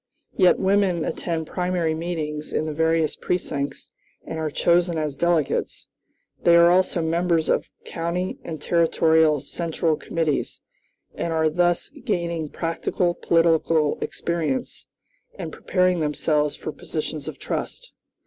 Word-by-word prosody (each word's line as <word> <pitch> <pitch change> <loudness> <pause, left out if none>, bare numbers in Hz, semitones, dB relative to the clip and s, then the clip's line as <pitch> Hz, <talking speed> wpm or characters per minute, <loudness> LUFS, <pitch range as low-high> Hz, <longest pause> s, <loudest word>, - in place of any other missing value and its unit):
Yet 185 -3 +5
women 190 -4 +2
attend 165 -2 -2
primary 180 -2 -1
meetings 160 -2 -4
in 155 - 0
the 155 - -3
various 160 0 +1
precincts 145 -5 -3 0.3
and 160 0 -5
are 155 -1 -1
chosen 170 +2 +2
as 150 -3 -2
delegates. 170 -2 0 0.6
They 170 - +5
are 170 0 +7
also 180 -2 +2
members 165 0 +1
of - - +1 0.2
county 170 +2 -3
and 160 -2 -6
territorial 160 -2 +3
central 165 -1 -1
committees, 160 -2 -2 0.5
and 170 - -3
are 160 -1 +2
thus 175 +1 +1
gaining 170 -3 -2
practical 175 +2 -1
political 165 -3 +2
experience, 170 +10 -3 0.5
and - - -6
preparing 180 -1 +1
themselves 150 -1 0
for - - -5
positions - - -5
of - - -6
trust. - - -5
165 Hz, 125 wpm, -23 LUFS, 155-175 Hz, 0.6 s, are